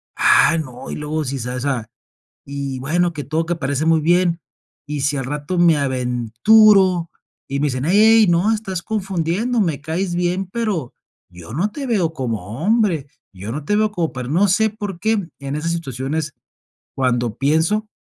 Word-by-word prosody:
ah, 165 - +4
no, 130 -6 -6
y - - -4
luego 150 +1 -3
si 135 +1 -3
se 125 +1 -4
hace, 125 +3 -2 0.8
y 140 -2 -4
bueno, 170 +6 0
que 145 -2 -6
todo, 155 +4 -1
que 175 -1 -1
parece 140 0 -2
muy 165 -1 +4
bien, 175 +1 +2 0.5
y 145 -1 -4
si 145 +1 +1
al 135 - -3
rato 150 +5 -3
me 170 -2 +5
aventuro, 150 - +3 0.4
y 140 +1 -2
me 150 - +2
dicen, 130 +1 -3
hey 170 - +2 0.3
hey, - - +4
no, 175 +6 +3
estás 190 -5 -4
confundiendo, 195 +3 -1
me 165 -8 0
caes 175 +4 -2
bien, 180 +2 -1
pero, 200 - -2 0.4
yo 90 +3 -11
no 190 +8 0
te 280 +2 -5
veo 190 -10 0
como 115 - -4
hombre, 205 - +2 0.3
yo 100 +4 -6
no 150 +3 -5
te 205 - +1
veo 215 0 +1
como 170 -5 -2
per 125 -1 -5
no 190 +7 +3
sé, 220 +4 +3
por 205 -4 -6
qué, 220 -4 0
en 140 0 -4
esas 165 +2 -2
situaciones 145 -1 -3 0.6
cuando 120 -4 0
pienso 160 +10 +1
160 Hz, 180 wpm, -20 LUFS, 135-190 Hz, 0.8 s, me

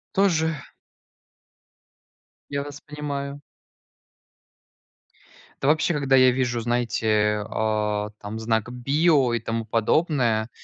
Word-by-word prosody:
Тоже. 165 -5 +2 1.9
Я 140 0 -2
вас 145 0 -9
понимаю. 145 -1 -5 2.2
Да 135 - 0
вообще, 155 +3 +3
когда 140 -3 +2
я 130 -1 +6
вижу, 120 -2 -1
знаете, 110 -3 +1
а, 105 -1 -1
там 105 +2 -6
знак 110 0 -1
"Био" 140 +1 +2
и 120 - 0
тому 115 0 -3
подобное, 115 0 +1
125 Hz, 95 wpm, -24 LUFS, 110-145 Hz, 2.2 s, я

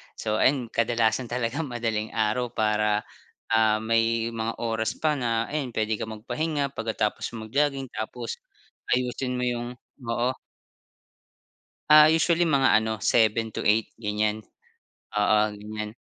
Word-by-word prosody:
So, 110 -1 -2
ayun 130 -4 +2
kadalasan 115 +1 +1
talaga 120 +3 -2
madaling 115 -7 -3
araw 110 +3 +1
para, 105 -1 +1 0.4
ah, 110 -1 +3
may 115 0 +1
mga 115 0 -3
oras 110 -1 -1
pa 155 -1 +1
na 115 -4 0
ayan, 145 -4 -3
pwede 110 -1 -1
kang 110 +2 -5
magpahinga 140 +4 -2
pagkatapos 110 -2 -2
mag-jogging 135 +4 0
tapos 115 +1 -5 0.5
ayusin 125 0 0
mo 125 - -1
yung 120 -1 -2 0.3
oo. 120 +2 -1 1.6
Ah, 150 0 +9
usually 165 +2 +3
mga 135 -7 +4
ano, 110 0 -2
7 110 -1 +2
to - - -5
8 110 +2 +2
ganyan. 105 0 -1 0.8
Oo, 105 +1 +3 0.2
ganyan. 105 +1 -6
115 Hz, 125 wpm, -26 LUFS, 110-125 Hz, 1.6 s, Ah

